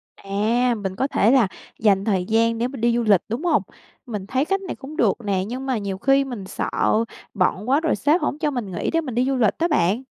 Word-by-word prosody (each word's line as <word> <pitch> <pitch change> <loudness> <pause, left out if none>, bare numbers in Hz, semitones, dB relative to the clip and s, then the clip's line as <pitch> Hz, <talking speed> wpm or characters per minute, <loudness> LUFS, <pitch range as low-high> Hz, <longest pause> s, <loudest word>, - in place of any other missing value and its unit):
À, 225 +5 0
mình 195 -3 -4
có 265 - 0
thể 230 -5 +3
là 255 -6 +5 0.3
dành 200 -2 +3
thời 190 -5 +1
gian 230 +2 +2
để 235 +2 0
mình 255 -2 -8
đi 235 0 +3
du 240 - +1
lịch, 205 -5 +4
đúng 235 +8 -3
hông? 340 - +3 0.4
Mình 210 -6 -5
thấy 260 +6 0
cách 390 +3 0
này 380 - -5
cũng 295 +3 -10
được - - +3
nè, 195 -2 0
nhưng 255 +4 -5
mà 260 -3 0
nhiều 200 -2 -4
khi 270 +6 +3
mình 240 -7 -6
sợ 190 - -3 0.6
bận 200 +2 0
quá 275 +3 +4
rồi 325 -1 +1
sếp 295 - +2
hổng 290 - -1
cho 305 -2 0
mình 240 -8 -4
nghỉ 175 - -2
để 330 - +1
mình 260 -7 -6
đi 245 +1 +2
du 270 0 0
lịch 225 -6 +3
đó 335 - +2
bạn. 220 - +1
235 Hz, 255 wpm, -22 LUFS, 200-270 Hz, 0.6 s, là